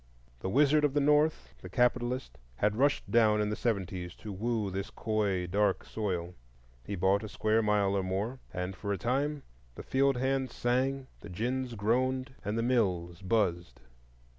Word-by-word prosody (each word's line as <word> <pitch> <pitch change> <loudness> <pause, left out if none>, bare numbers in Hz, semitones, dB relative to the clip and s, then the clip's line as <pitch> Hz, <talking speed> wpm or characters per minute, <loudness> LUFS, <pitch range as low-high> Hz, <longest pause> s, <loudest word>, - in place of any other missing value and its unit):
The 80 - -3
Wizard 150 +6 +4
of 145 -1 +2
the - - +4
North—the 150 +2 +1
Capitalist—had 120 - 0
rushed 140 +4 +1
down 110 -3 +4
in 105 0 0
the - - -1
seventies 95 -6 -2
to 105 -2 -8
woo 110 0 -1
this 95 +1 -4
coy 105 -4 -1
dark 100 +4 +1
soil. 90 -5 -3 0.5
He 100 - -4
bought 95 +3 +2
a 110 - -6
square 110 +2 +1
mile 105 -2 +2
or 100 - +2
more, 100 +7 -2
and 90 +1 -4
for 100 +2 -4
a 100 - 0
time 140 - -1 0.3
the - - -8
field 135 0 +2
hands 130 0 -1
sang, 130 +2 0
the 105 - -10
gins 120 +6 -2
groaned, 130 +5 0
and 105 +2 -2
the 115 - +1
mills 90 -8 0
buzzed. 90 - 0
110 Hz, 165 wpm, -30 LUFS, 95-130 Hz, 0.5 s, Wizard